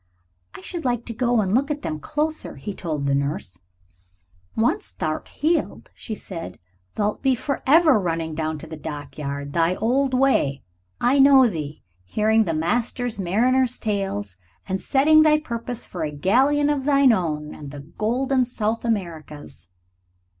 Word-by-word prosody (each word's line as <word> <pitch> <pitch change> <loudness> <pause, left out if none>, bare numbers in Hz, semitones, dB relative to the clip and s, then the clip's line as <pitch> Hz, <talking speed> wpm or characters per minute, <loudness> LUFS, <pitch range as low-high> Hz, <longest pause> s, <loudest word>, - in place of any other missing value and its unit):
"I - - -9
should 335 - -6
like 245 -2 -1
to 230 - -5
go 240 0 +2
and 190 -1 -1
look 275 +5 +2
at 295 -1 -3
them 155 -1 -3
closer," 310 - -2
he 205 - -6
told 155 -6 -3
the 140 - +1
nurse. 140 - -3 0.9
"Once 310 - 0
thou'rt - - -3
healed," 325 +2 -1
she 220 - -6
said, 165 - -8 0.4
"thou'lt 210 0 -1
be 265 -2 +3
forever 285 +2 +3
running 165 -3 -2
down 155 0 -2
to 150 - -9
the 160 0 -8
dockyard. 145 -2 -6
Thy 170 +2 +2
old 260 +5 +1
way 250 - +2 0.4
I 260 +3 +3
know 270 -1 +7
thee, 155 -7 -5 0.2
hearing 215 - +2
the 165 -3 -1
master 240 +9 0
mariners' 245 +7 +2
tales, 195 - -3 0.3
and 190 0 -2
setting 310 +3 +5
thy 305 -1 +5
purpose 240 -4 -5
for 175 -3 -5
a 155 - -1
galleon 265 - +2
of 275 -3 -2
thine 280 -3 +5
own 150 -6 -2
and 145 -2 -9
the 145 0 -8
golden 250 - 0
South 230 -2 -2
Americas." 170 - -4
215 Hz, 155 wpm, -23 LUFS, 155-265 Hz, 0.9 s, know